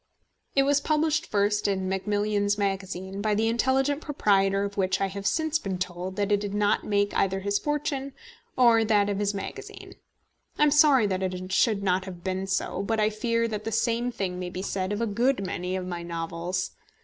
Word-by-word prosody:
It 275 - +5
was 285 +1 +2
published 310 0 +1
first 205 0 +1
in 190 -2 -1
Macmillan's 205 +1 0
Magazine, 195 -1 -3
by 210 0 +1
the 220 +2 +1
intelligent 265 +5 +1
proprietor 195 -9 +2
of 200 0 -4
which 185 -1 +1
I 195 - +2
have 195 +1 -4
since 315 -1 +1
been 190 -2 -3
told 180 +1 -4
that 205 0 -1
it 205 - +4
did 205 0 -4
not 205 0 +2
make 205 0 0
either 195 0 +1
his 200 +1 0
fortune 280 -2 -2 0.4
or 235 -3 +5
that 205 -2 +2
of 200 - -2
his 205 0 0
magazine. 195 - -7 0.6
I - - +3
am 300 - +5
sorry 285 -5 +6
that 190 -2 -1
it 185 0 -3
should 200 0 +2
have 185 -1 -1
been 190 0 -2
so; 190 0 -1
but 220 +2 -1
I 215 0 +2
fear 230 +1 0
that 210 -1 -4
the 225 - -3
same 235 +2 0
thing 185 -5 -3
may 180 -1 -4
be 185 +1 -5
said 190 -1 -2
of 205 +2 -2
a - - +2
good 235 0 +1
many 180 0 -3
of 185 -1 -3
my 175 -1 -4
novels. 170 +2 -3
205 Hz, 200 wpm, -26 LUFS, 190-230 Hz, 0.6 s, sorry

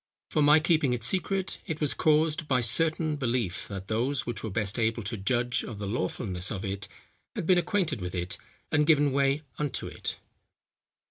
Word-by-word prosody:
For 155 - +2
my 150 +2 +7
keeping 155 -5 +2
it 120 -2 -2
secret, 190 - 0
it 160 -3 -3
was 150 -2 +2
caused 155 0 +2
by 130 -3 +3
certain 155 +4 +1
belief, 120 -8 -1
that 95 -1 -7
those 125 +6 0
which 120 - -4
were 110 - -2
best 105 +2 -1
able 115 0 0
to 110 +3 -2
judge 120 +4 0
of 110 - -7
the 100 - -4
lawfulness 95 -4 -3
of 95 -3 -4
it, 95 0 -4 0.5
had - - -3
been 180 +1 +5
acquainted 175 - 0
with 90 +1 -4
it, 90 +3 -3 0.3
and 150 -1 +3
given 145 -3 +5
way 140 +2 +2 0.2
unto 145 -3 -2
it." - - -5
130 Hz, 185 wpm, -28 LUFS, 105-155 Hz, 0.5 s, my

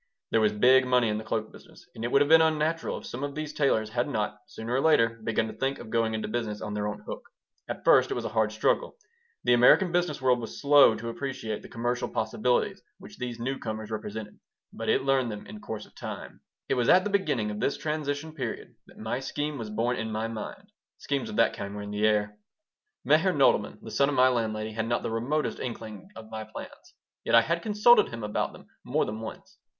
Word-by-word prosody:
There 115 - +3
was 105 -1 +4
big 130 +5 +5
money 125 -2 +3
in 105 0 -1
the - - -7
cloak 110 0 -3
business, - - -16
and 110 - -8
it 120 - -2
would 140 - +5
have - - -3
been 160 0 +8
unnatural 160 +1 +1
if - - -10
some 125 +3 -6
of 145 -1 -4
these 155 0 -4
tailors 110 -8 +1
had 120 +3 0
not, 105 -5 -2
sooner 115 +2 -6
or 130 - +2
later, 115 -8 +3
begun 110 0 0
to 110 - -6
think 135 +1 -1
of 110 - -10
going 115 -1 +1
into 110 - -3
business 110 -2 -3
on 105 - -5
their 105 0 -1
own 105 0 -5
hook. - - -5 0.5
At - - -6
first - - +6
it - - -2
was - - -3
a - - -2
hard 110 -1 +1
struggle. 480 - 0 0.5
The 125 - +4
American 125 +9 +6
business 175 -4 0
world 130 -2 +3
was 115 - -7
slow 145 -5 +6
to 115 +2 -5
appreciate 115 -4 -4
the - - -12
commercial 120 +1 -2
possibilities 110 +3 0 0.2
which - - -13
these 120 -2 -4
new 130 +3 -3
comers 110 -1 -5
represented, 105 0 -6 0.3
but - - -4
it - - +3
learned 135 -3 +2
them 105 -1 -7
in 210 +2 -10
course 110 - -6
of - - -22
time - - -8 0.3
It - - +1
was 125 -2 +1
at 185 +1 +6
the 205 - -2
beginning 145 - 0
of 105 - -5
this 140 - 0
transition 150 0 -3
period 130 -7 -5
that - - -18
my 110 +3 -3
scheme 145 +1 -3
was 110 -2 -5
born 115 +4 0
in 110 0 -3
my 110 +1 -2
mind. 115 -2 -7 0.3
Schemes 140 +8 -2
of 215 - -6
that - - +3
kind 100 +1 -6
were 105 - -5
in 105 - -7
the 105 +1 +2
air 105 0 0 0.7
Meyer - - +4
Nodelman, - - +3
the - - -8
son 140 0 +3
of 145 - -1
my 130 0 +6
landlady, 110 -3 -1
had 110 +1 -3
not 120 - 0
the - - -2
remotest 130 +7 -1
inkling 110 -5 -7
of 110 0 -11
my 110 0 -5
plans, 110 - -11 0.3
yet - - +2
I 115 - +9
had 170 +7 -1
consulted 210 +1 +5
him 115 -1 -7
about 105 0 -1
them - - -14 0.2
more - - 0
than 110 +1 -5
once. 110 - -9
115 Hz, 235 wpm, -28 LUFS, 110-140 Hz, 0.7 s, I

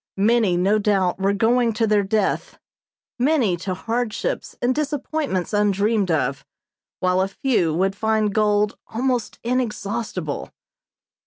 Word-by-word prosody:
Many, 210 -3 +3
no 200 +4 +2
doubt, 195 -3 +1
were 195 +1 +2
going 230 +3 +2
to 225 +1 +1
their 210 -1 +3
death, 200 0 -1 0.6
many 250 - +2
to 185 +1 -4
hardships 235 - -3
and 245 +1 +1
disappointments 290 - -2
undreamed 205 0 +2
of, 140 -4 0 0.6
while 185 0 +2
a 190 - +1
few 195 -5 0
would 190 +3 +1
find 215 -1 +1
gold 210 -1 +1
almost 245 0 -1
inexhaustible. 225 - -2
210 Hz, 125 wpm, -22 LUFS, 190-235 Hz, 0.6 s, Many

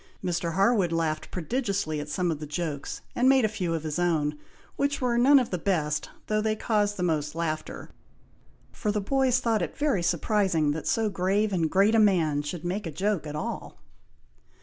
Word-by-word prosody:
Mr. 170 -2 -1
Harwood 195 -2 +3
laughed 160 -2 -1
prodigiously 195 - -2
at 145 0 -6
some 175 +3 0
of 155 - -4
the 150 - -6
jokes, 150 -2 -4
and 255 +2 +4
made 265 -3 +5
a - - +4
few 185 -6 -2
of 160 - -4
his 155 +1 -3
own, 155 -4 +1 0.4
which 285 0 0
were 245 -2 0
none 265 +4 +6
of 255 -3 +1
the 180 - -1
best, 155 -5 -1 0.2
though 215 0 0
they 215 0 0
caused 210 -2 0
the 180 - -2
most 155 -3 -1
laughter, 155 -2 -4 0.8
for 210 - -2
the 210 - 0
boys 255 +3 +2
thought 230 -3 +1
it - - -4
very 285 -11 +1
surprising 175 -2 +1
that 155 +1 -4
so 225 -1 +1
grave 200 +2 0
and 165 -3 +1
great 200 +5 +3
a 225 - +5
man 170 -8 +3
should 155 +3 -6
make 185 +2 -2
a - - -4
joke 190 0 -1
at 150 - -5
all. 150 - -5
180 Hz, 195 wpm, -27 LUFS, 160-215 Hz, 0.8 s, none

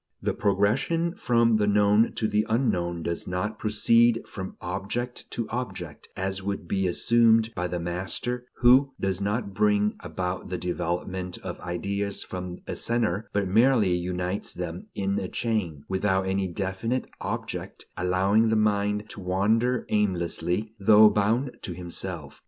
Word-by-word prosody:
The - - -1
progression 135 +12 +1
from 115 - +3
the 105 -1 +1
known 105 +2 +4
to 110 - 0
the 105 0 +2
unknown 90 -8 0
does 85 +1 -3
not 90 +4 -3
proceed 115 +2 +3
from 95 -2 -7
object 100 +7 -4
to 115 -2 -3
object, 125 +2 -5
as 95 +1 -2
would 100 -2 -4
be 95 0 0
assumed 115 +4 +4
by 90 -3 -2
the 90 0 -3
master 95 +8 -3
who 130 +3 +6
does 95 0 -1
not 100 0 -1
bring 105 +1 +2
about 90 0 -4
the 90 - -2
development 90 +1 -3
of - - -6
ideas 100 +3 -2
from 90 -1 -6
a - - -4
center, 110 -4 0
but 100 -1 0
merely 110 -1 +4
unites 90 +2 -3
them 90 0 -5
in 100 0 0
a 95 - -3
chain, 90 -11 -2
without 95 0 +1
any 95 0 0
definite 95 +8 -2 0.2
object, - - -5
allowing 95 +5 +2
the 110 - +2
mind 105 -1 +1
to - - -7
wander 110 +7 +1
aimlessly, 100 +1 0
though 105 +1 +7
bound 115 +6 +1
to 90 - -4
himself. 85 -3 -6
100 Hz, 145 wpm, -26 LUFS, 90-110 Hz, 0.2 s, though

